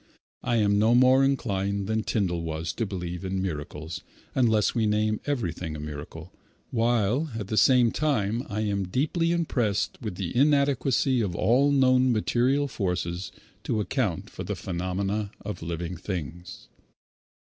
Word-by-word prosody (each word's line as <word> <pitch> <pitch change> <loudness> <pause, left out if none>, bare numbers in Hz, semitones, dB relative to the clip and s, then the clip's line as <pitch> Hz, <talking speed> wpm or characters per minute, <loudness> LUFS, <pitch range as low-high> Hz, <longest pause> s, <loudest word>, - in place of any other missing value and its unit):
I 120 -1 0
am 100 -2 +3
no 110 +3 +4
more 130 +2 +6
inclined 100 -7 0
than 110 +2 0
Tyndall 95 -6 -1
was 80 0 -3
to 115 - -2
believe 90 -2 -5
in 95 0 -2
miracles 80 -2 -4 0.3
unless 110 -5 +3
we 115 -3 +1
name 105 0 +1
everything 90 - -2
a - - -6
miracle, 75 +3 -8 0.4
while 120 +5 +1
at 105 -3 -5
the 110 - -1
same 125 0 +5
time 120 -7 0
I 105 0 -2
am 100 -3 -1
deeply 160 - 0
impressed 125 -12 0
with 105 -6 -4
the 90 0 -4
inadequacy 140 -2 +3
of 95 -5 -2
all 130 +9 +3
known 130 -2 +4
material 125 +5 +2
forces 90 -5 -3 0.3
to 110 - -1
account 105 - -1
for - - -6
the - - -3
phenomena 95 +3 -2 0.2
of 105 - -5
living 85 +2 -4
things. 90 -1 -6
105 Hz, 145 wpm, -26 LUFS, 90-125 Hz, 0.4 s, more